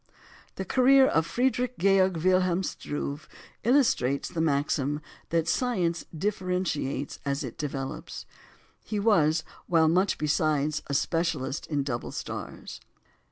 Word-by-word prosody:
The 190 - -4
career 265 +5 +5
of 160 -10 +2
Friedrich 250 +3 0
Georg 190 -1 +3
Wilhelm 185 +1 +2
Struve 145 -3 -5 0.3
illustrates 230 - +2
the 170 -3 -2
maxim 145 -1 0 0.3
that 165 -1 +1
science 180 -7 0
differentiates 180 -6 -2
as 140 +1 -1
it 125 -4 -6
develops. 135 -4 -5 0.6
He 210 - -3
was, 165 -7 +3 0.2
while 165 -2 +4
much 185 +5 +2
besides, 150 0 +1
a 140 - -2
specialist 165 -4 -1
in 145 -3 0
double 120 -3 -4
stars. - - -7
165 Hz, 115 wpm, -27 LUFS, 145-190 Hz, 0.6 s, career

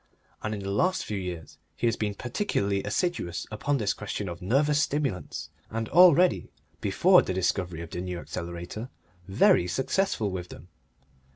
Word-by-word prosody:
And 110 0 -2
in 100 - -6
the 100 0 -3
last 185 - +1
few 105 -2 -3
years 90 -3 -7 0.2
he - - -2
has 115 -1 +2
been 105 -3 -2
particularly 100 - -1
assiduous 100 - -2
upon 140 +7 0
this 105 -5 0
question 105 -1 -5
of 85 -1 -6
nervous 145 +9 +2
stimulants, 140 - -2 0.2
and 115 0 -3
already, 180 +1 +5 0.3
before 175 - +5
the 95 - -3
discovery 90 -2 -1
of 85 - -10
the 90 - -4
New 90 -1 -4
Accelerator, 85 +7 -6 0.4
very 95 -2 +4
successful 135 - 0
with 90 -1 -5
them. 90 - -12
105 Hz, 160 wpm, -27 LUFS, 90-140 Hz, 0.4 s, already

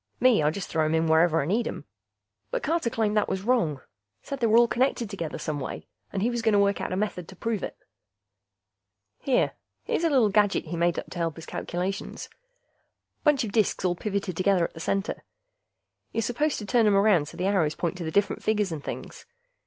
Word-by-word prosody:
Me, 250 -7 +5
I 150 - +3
just 180 +4 -4
throw 160 -1 0
'em 155 +1 +1
in 160 0 +2
wherever 160 0 +4
I - - -3
need 215 +9 +1
'em. - - -6 0.6
But - - -2
Carter 325 -6 +1
claimed 220 -2 0
that 210 - +2
was 190 0 -2
wrong. 185 - +1 0.4
Said 275 - -5
they 235 - +2
were 220 +1 +5
all 240 0 +6
connected 240 -3 0
together 170 -6 -4
some 150 -1 -3
way, 130 - -6 0.3
and 195 - -2
he 240 - +2
was 240 -1 -2
gonna 220 -2 +3
work 200 0 +2
out - - -3
a - - 0
method 190 -4 -2
to 190 - -12
prove 225 +1 -2
it. - - -5 1.4
Here... - - +2 0.3
here's - - -1
a 330 - +3
little 255 -8 +4
gadget 205 0 +2
he 170 +2 -5
made 170 0 +1
up - - -5
to 175 - -6
help 165 -2 -1
his 165 - -9
calculations. 185 +3 -4 0.9
Bunch 295 -4 +4
of 215 - -4
disks 210 -3 +1
all 180 - +3
pivoted 195 -1 -3
together 185 0 +2
at - - -2
the 165 - -10
center; 195 +4 -2 0.9
you're 225 - -1
supposed 260 +6 0
to 210 - -5
turn 225 +2 +3
'em 205 - +4
around 195 -7 +4
so - - -10
the 180 - -1
arrows 180 -6 +2
point 175 +1 -2
to - - -3
the 160 - -3
different 200 +4 +1
figures 210 -3 +1
and 155 -3 -5
things. - - -7
200 Hz, 220 wpm, -26 LUFS, 170-230 Hz, 1.4 s, all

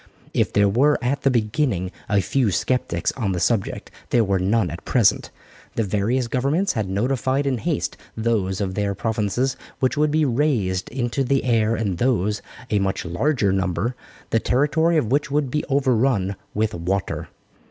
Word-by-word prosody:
If - - +1
there 100 0 +4
were 135 +9 +3
at 130 +3 -1
the 135 - +3
beginning 110 - 0 0.2
a 100 -1 +3
few 125 +2 +1
sceptics 85 -2 0
on 105 -7 -2
the 90 - -2
subject, 100 +3 -1 0.2
there 120 - +3
were 100 -2 +1
none 95 -1 +1
at 85 - -8
present. 115 -6 +2 0.5
The 115 - +1
various 110 +5 0
governments 140 +11 +1
had 105 -4 -2
notified 130 +6 0
in 130 -3 0
haste - - -2 0.2
those 110 -5 0
of 95 -2 -2
their 100 0 -1
provinces 110 +4 -1 0.2
which 130 +1 +1
would 150 +1 +3
be 155 +1 +2
raised 115 -9 0
into 120 0 -1
the 135 +1 +1
air 115 -2 +2
and 100 -6 -2
those, 105 -5 +1 0.3
a 105 - +3
much 95 -2 -1
larger 100 - +1
number, 95 +5 -1 0.4
the 115 - +3
territory 160 +8 +2
of 120 -7 0
which 145 +2 +1
would 145 -2 0
be 150 - 0
overrun 125 -7 +1 0.2
with 110 +1 0
water. 95 +3 -2
115 Hz, 170 wpm, -22 LUFS, 100-135 Hz, 0.5 s, there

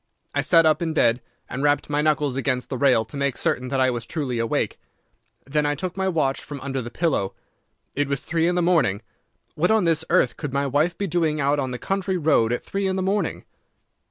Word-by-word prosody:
I - - +1
sat 165 -2 +5
up 155 0 +3
in 160 -2 -2
bed 120 -3 +3 0.3
and 125 - -5
rapped 145 0 +2
my 145 0 0
knuckles 150 -3 +1
against 130 -1 -1
the 130 - -2
rail 125 -5 +4
to 115 - -12
make 140 -2 -1
certain 125 - -1
that 135 +1 -1
I 130 -1 +3
was 120 -1 -5
truly 130 -6 -3
awake. 115 -1 -1 0.7
Then 150 +2 0
I 145 0 0
took 180 +4 -4
my 190 0 -1
watch 155 -7 0
from 145 -1 -7
under 135 -1 -3
the 120 - -6
pillow. 120 - -1 0.6
It 145 0 0
was 140 -2 -1
three 165 0 0
in 175 - +1
the 180 - +1
morning. 150 - +2 0.5
What 175 +4 +1
on 220 -2 +3
this 165 -2 +2
earth 185 - +2
could 145 -4 -5
my 140 0 +1
wife 150 +6 +1
be 200 - -1
doing 160 -4 0
out 145 +1 +2
on 130 -2 -1
the 125 - -4
country 195 +4 -1
road 145 -8 +2
at 120 - -2
three 195 0 -2
in 190 - 0
the 190 - -1
morning? 200 +2 -1
145 Hz, 230 wpm, -23 LUFS, 130-170 Hz, 0.7 s, sat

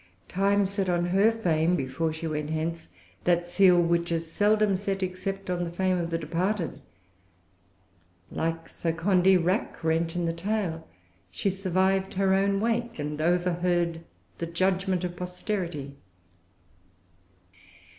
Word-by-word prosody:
Time 200 +2 +2
set 195 -1 -1
on 175 -1 +1
her 195 +5 +4
fame, 175 -6 +1
before 155 +3 -1
she 160 +1 -6
went 150 -1 -2
hence, 160 +1 -3 0.4
that 175 -1 +3
seal 180 0 +5
which 170 0 +1
is 165 -1 -2
seldom 210 +1 +3
set 195 0 -2
except 195 +2 -4
on 180 -1 -1
the 170 - -3
fame 185 +1 0
of 170 -1 -2
the 165 - 0
departed. 170 +3 -2 1.5
Like 165 0 -2
Sir 165 -1 -2
Condy 185 +2 +4
Rackrent 165 -2 0
in 175 -1 0
the 165 - 0
tale, 170 -3 -2 0.4
she 110 - -1
survived 190 0 0
her 190 0 +3
own 195 +1 +2
wake, 235 +2 -1
and 150 0 -3
overheard 175 0 +1 0.4
the 170 - -2
judgment 185 +1 0
of 175 -1 -3
posterity. 180 -5 -4
175 Hz, 135 wpm, -27 LUFS, 165-195 Hz, 1.5 s, seal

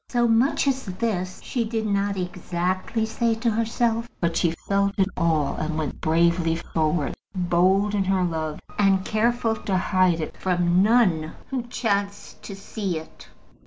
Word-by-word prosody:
So 240 -1 +2
much 235 +5 +2
as 265 -1 0
this 185 -2 -2
she 245 - -1
did 220 0 -2
not 200 -1 0
exactly 185 +4 -2
say 225 +1 0
to 230 +1 0
herself; 230 +1 0
but 170 -1 0
she 170 -1 +1
felt 200 0 +2
it 190 -1 +3
all, 160 -4 +1
and 155 0 -2
went 155 -3 -4
bravely 165 +1 +2
forward, 160 -2 -1 0.2
bold 185 +3 +2
in 200 -2 +1
her 190 -1 +2
love, 160 -3 -2 0.2
and 195 -2 +3
careful 225 +1 +1
to 195 -3 -1
hide 185 -2 +2
it 155 - -5
from 180 -1 +2
none 195 -8 +3 0.2
who 265 -2 -1
chanced 200 -4 -2
to 200 - -8
see 195 -2 -4
it. 160 - -11
190 Hz, 160 wpm, -24 LUFS, 170-220 Hz, 0.2 s, it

